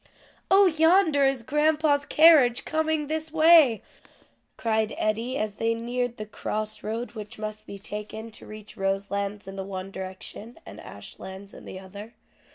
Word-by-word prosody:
"Oh, 395 +1 +6
yonder 320 -3 +4
is 270 -3 0
grandpa's 300 +1 +2
carriage 300 -7 +5
coming 315 -1 0
this 315 +1 -3
way!" 315 -7 +6 0.7
cried 220 -1 0
Eddie 225 +5 -1
as 215 -4 -2
they 230 0 0
neared 245 +1 -3
the 215 - -5
cross 215 0 -4
road 225 +3 -4
which 210 -2 -9
must 215 0 -7
be 200 - -8
taken 210 +2 -7
to - - -12
reach 215 -1 -10
Roselands 200 +1 -2
in 195 0 -8
the 195 - -3
one 190 0 -6
direction, 190 +4 -8
and - - -11
Ashlands 190 +1 -10
in - - -12
the 185 - -8
other. 200 +4 -11
225 Hz, 155 wpm, -26 LUFS, 205-295 Hz, 0.7 s, Oh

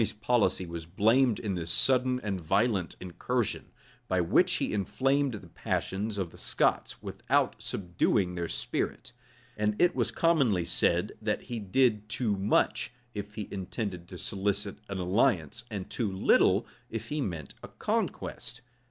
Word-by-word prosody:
Henry's 110 - 0
policy 105 -4 +2
was 85 -1 -7
blamed 110 +6 +3
in 105 -4 -2
this 85 -2 -3
sudden 125 +5 +3
and 100 -4 -3
violent 95 0 +1
incursion, 110 +6 -2 0.4
by 95 - +1
which 120 - +3
he - - 0
inflamed 130 +7 +1
the 95 -4 -9
passions 100 +5 -2
of 95 -4 -2
the - - -14
Scots, - - 0
without - - +1
subduing 90 0 0
their 85 -1 -2
spirit; - - -3 0.4
and 105 0 0
it 175 0 +4
was - - +1
commonly 135 - +2
said, - - +2
that - - -1
he 120 -2 -4
did 105 0 +2
too 105 -2 0
much, 100 +3 +1 0.2
if 105 0 -6
he 105 -3 -4
intended 95 -2 -4
to 90 - -9
solicit 100 +1 -2
an 100 - -3
alliance, 95 - +1
and 100 -4 -5
too 110 -5 -2
little, 95 - +4 0.2
if 115 0 -5
he 150 0 -1
meant 80 - -4
a - - -8
conquest. 120 - -3
105 Hz, 150 wpm, -29 LUFS, 90-115 Hz, 0.4 s, it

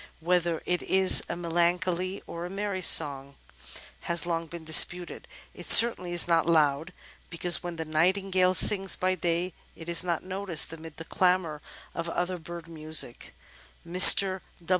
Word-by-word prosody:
Whether 170 -1 -3
it 180 0 -3
is 190 0 +4
a - - -5
melancholy 175 +2 -4
or 170 - -10
a 175 - -8
merry 195 0 -6
song 140 -4 +2 0.7
has 170 -2 -2
long 165 -1 -5
been 170 0 -12
disputed. 175 +3 +2 0.3
It - - -9
certainly 225 -6 +5
is 175 -1 -1
not 165 -1 -1
loud, 155 0 -1 0.4
because 175 0 -1
when 175 -1 -8
the 160 0 -7
Nightingale 185 +3 -1
sings 195 +2 +3
by 185 0 -3
day 175 0 -4 0.2
it 165 - -14
is 170 0 -4
not 170 -2 -5
noticed 185 -4 -3
amid 160 -1 -13
the 165 - -11
clamour 180 -5 -2 0.3
of 170 0 -7
other 175 +1 -5
bird 170 +1 -12
music. 155 -6 -4 0.5
Mr. 185 +2 +6
175 Hz, 150 wpm, -25 LUFS, 165-185 Hz, 0.7 s, Mr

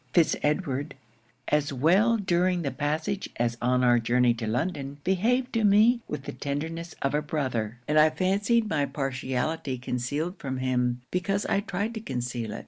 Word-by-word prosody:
Fitz 170 -2 +4
Edward, 145 -2 -1 0.5
as 150 -1 +1
well 185 - +3
during 180 -2 +1
the 140 - -1
passage 155 +6 -2
as 120 0 0
on 125 +1 +2
our 120 -1 +5
journey 120 +1 +3
to 115 -1 -5
London, 140 +3 -2
behaved 245 +8 +1
to 230 -2 +1
me 215 +4 +5
with 150 -2 -5
the - - -5
tenderness 160 +4 -4
of 140 - 0
a 150 - +2
brother; 130 -7 -2
and 155 +1 +4
I 155 +1 +7
fancied 200 +6 +1
my 145 -7 0
partiality 135 +1 -2
concealed 145 +9 -3
from 130 -2 -4
him, 125 -1 0
because 195 +3 -1
I - - +1
tried 205 +2 -3
to 220 - -4
conceal 120 - -4
it. - - -5
150 Hz, 170 wpm, -27 LUFS, 125-185 Hz, 0.5 s, I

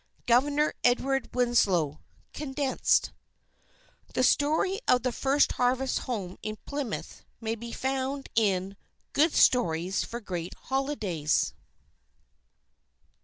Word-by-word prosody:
Governor 285 +5 +3
Edward 270 +2 +2
Winslow 195 - +2 0.3
(Condensed) 280 -2 0 1.0
_The 255 - +2
story 320 +10 +2
of 250 -1 +4
"The 255 - +1
First 275 +4 +2
Harvest 255 +1 +1
Home 195 -7 -4
in 215 0 -4
Plymouth" 280 -6 -5 0.2
may 225 -1 -2
be 235 +1 -7
found 270 +2 -2
in 195 -3 +1 0.4
"Good 305 +2 +3
Stories 185 -6 +3
for 235 - -6
Great 180 -6 -5
Holidays." 220 - -1
245 Hz, 100 wpm, -28 LUFS, 200-270 Hz, 1.0 s, of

